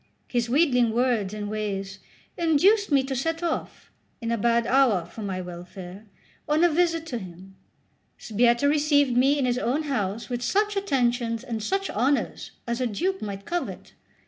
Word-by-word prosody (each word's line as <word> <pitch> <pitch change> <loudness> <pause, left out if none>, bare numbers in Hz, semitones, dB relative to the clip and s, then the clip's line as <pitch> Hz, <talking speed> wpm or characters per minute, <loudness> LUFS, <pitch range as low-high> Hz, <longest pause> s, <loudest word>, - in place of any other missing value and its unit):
His 240 -1 -1
wheedling 250 -4 +3
words 235 -5 +1
and 210 -1 -5
ways 200 -2 -4 0.4
induced 355 +5 +3
me 275 -2 +4
to 265 0 -3
set 325 +6 -2
off, 335 -2 -4 0.3
in 230 0 -3
a - - +2
bad 235 +1 +2
hour 240 -9 +3
for 175 +6 -10
my 190 -3 -3
welfare, 180 +3 -9 0.4
on 305 +3 +3
a 350 - +6
visit 330 0 +1
to 250 -7 -4
him. 190 0 -11 0.6
Sbietta 235 +4 +2
received 290 -3 +3
me 270 +4 +4
in 275 - +1
his 250 0 0
own 265 +6 0
house 215 -6 -2
with 245 -1 -3
such 410 - +1
attentions 245 - 0
and 230 -4 -4
such 390 - -1
honours 265 +6 0 0.2
as 235 0 -2
a 250 - +1
duke 370 - -2
might 200 -1 -6
covet. 350 0 -4
245 Hz, 170 wpm, -25 LUFS, 215-295 Hz, 0.6 s, a